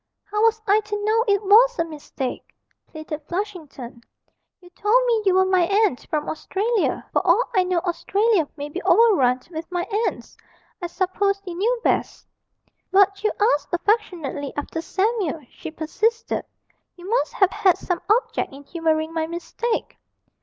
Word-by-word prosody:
'How 420 Hz, 0 st, 0 dB
was 445 Hz, 0 st, +3 dB
I 410 Hz, +1 st, +4 dB
to 415 Hz, -1 st, -4 dB
know 450 Hz, +2 st, +3 dB
it 405 Hz, 0 st, +2 dB
was 470 Hz, +5 st, +6 dB
a 335 Hz, -, +1 dB
mistake?' 290 Hz, -5 st, -6 dB, 0.3 s
pleaded 310 Hz, -1 st, -7 dB
Flushington. 325 Hz, -, -6 dB, 0.6 s
'You 355 Hz, -1 st, -18 dB
told 435 Hz, +7 st, +2 dB
me 465 Hz, -3 st, +2 dB
you 375 Hz, -, +4 dB
were 375 Hz, 0 st, +4 dB
my 375 Hz, -1 st, +3 dB
aunt 400 Hz, -, +1 dB
from 300 Hz, -1 st, -2 dB
Australia; 415 Hz, +7 st, -1 dB
for -, -, +3 dB
all 375 Hz, +6 st, +4 dB
I 375 Hz, -, +4 dB
know 365 Hz, -1 st, -1 dB
Australia 390 Hz, 0 st, +1 dB
may 290 Hz, 0 st, -4 dB
be 345 Hz, +6 st, -6 dB
overrun 275 Hz, -, +4 dB
with 325 Hz, +2 st, -7 dB
my 355 Hz, -1 st, -1 dB, 0.2 s
aunts. -, -, -6 dB, 0.5 s
I 350 Hz, -, -2 dB
supposed 395 Hz, +3 st, -1 dB
you 360 Hz, -, -5 dB
knew 465 Hz, +7 st, 0 dB
best.' -, -, 0 dB, 0.6 s
'But 395 Hz, +1 st, +3 dB
you 430 Hz, -, +2 dB, 0.2 s
asked 290 Hz, -, -3 dB
affectionately 345 Hz, -, -1 dB
after 305 Hz, +3 st, -3 dB
Samuel,' 375 Hz, -, -1 dB
she -, -, -8 dB
persisted; 430 Hz, +9 st, -1 dB, 0.5 s
'you 355 Hz, +1 st, -11 dB
must 470 Hz, +4 st, 0 dB
have 385 Hz, -2 st, +3 dB
had 395 Hz, -4 st, +3 dB
some 360 Hz, -2 st, -3 dB
object 455 Hz, +4 st, +1 dB
in 275 Hz, +1 st, -12 dB
humouring 320 Hz, 0 st, -1 dB
my 320 Hz, -1 st, -1 dB
mistake.' 345 Hz, +8 st, -4 dB
375 Hz, 160 wpm, -23 LUFS, 320-425 Hz, 0.6 s, was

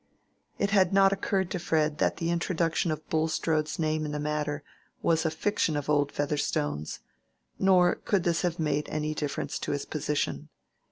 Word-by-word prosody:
It 200 Hz, -, 0 dB
had 190 Hz, -3 st, +4 dB
not 195 Hz, 0 st, +5 dB
occurred 195 Hz, -2 st, -1 dB
to 180 Hz, -, -2 dB
Fred 155 Hz, -3 st, 0 dB
that -, -, +1 dB
the 165 Hz, 0 st, -1 dB
introduction 170 Hz, 0 st, 0 dB
of 155 Hz, 0 st, -4 dB
Bulstrode's 155 Hz, -1 st, 0 dB
name 155 Hz, -1 st, 0 dB
in 150 Hz, -, -3 dB
the 150 Hz, -, -3 dB
matter 150 Hz, -1 st, -2 dB, 0.4 s
was 160 Hz, 0 st, +2 dB
a -, -, +2 dB
fiction 160 Hz, -1 st, 0 dB
of 145 Hz, +1 st, -2 dB
old 145 Hz, -1 st, +2 dB
Featherstone's; 75 Hz, -, -2 dB, 0.6 s
nor 180 Hz, -2 st, +5 dB
could 195 Hz, -4 st, 0 dB
this 170 Hz, -2 st, +1 dB
have 175 Hz, -1 st, -1 dB
made 150 Hz, -2 st, -1 dB
any 155 Hz, 0 st, -2 dB
difference 145 Hz, -2 st, -3 dB
to -, -, -2 dB
his -, -, -3 dB
position. -, -, -2 dB
160 Hz, 170 wpm, -28 LUFS, 150-175 Hz, 0.6 s, not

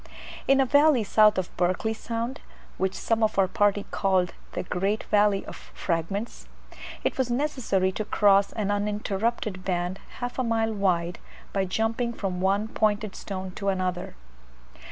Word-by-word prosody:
In 275 Hz, 0 st, +5 dB
a 270 Hz, -, +5 dB
valley 285 Hz, -2 st, +5 dB
south 210 Hz, 0 st, +5 dB
of 185 Hz, -1 st, -3 dB
Berkeley 185 Hz, +5 st, +1 dB
Sound, 230 Hz, +4 st, -4 dB, 0.4 s
which 190 Hz, 0 st, 0 dB
some 225 Hz, 0 st, 0 dB
of 215 Hz, -2 st, +1 dB
our 195 Hz, -1 st, +4 dB
party 205 Hz, +1 st, +1 dB
called 185 Hz, -2 st, +1 dB, 0.2 s
the -, -, -2 dB
"great 195 Hz, +4 st, -1 dB
valley 205 Hz, -1 st, +3 dB
of -, -, -8 dB
fragments," 190 Hz, +6 st, -4 dB, 0.6 s
it -, -, -1 dB
was 255 Hz, -2 st, +1 dB
necessary 240 Hz, -8 st, 0 dB
to 215 Hz, -, -3 dB
cross 200 Hz, -1 st, +4 dB
an 205 Hz, -2 st, -1 dB
uninterrupted 205 Hz, 0 st, -1 dB
band 180 Hz, 0 st, -2 dB, 0.2 s
half 245 Hz, +1 st, -4 dB
a -, -, +2 dB
mile 225 Hz, -1 st, +1 dB
wide, 180 Hz, -4 st, 0 dB, 0.3 s
by 195 Hz, -1 st, +1 dB
jumping 225 Hz, +5 st, -1 dB
from 185 Hz, -5 st, -3 dB
one 200 Hz, +3 st, +2 dB
pointed 215 Hz, -2 st, 0 dB
stone 190 Hz, -1 st, -5 dB
to 200 Hz, +2 st, -5 dB
another. 185 Hz, -2 st, -2 dB
205 Hz, 155 wpm, -26 LUFS, 190-225 Hz, 0.6 s, In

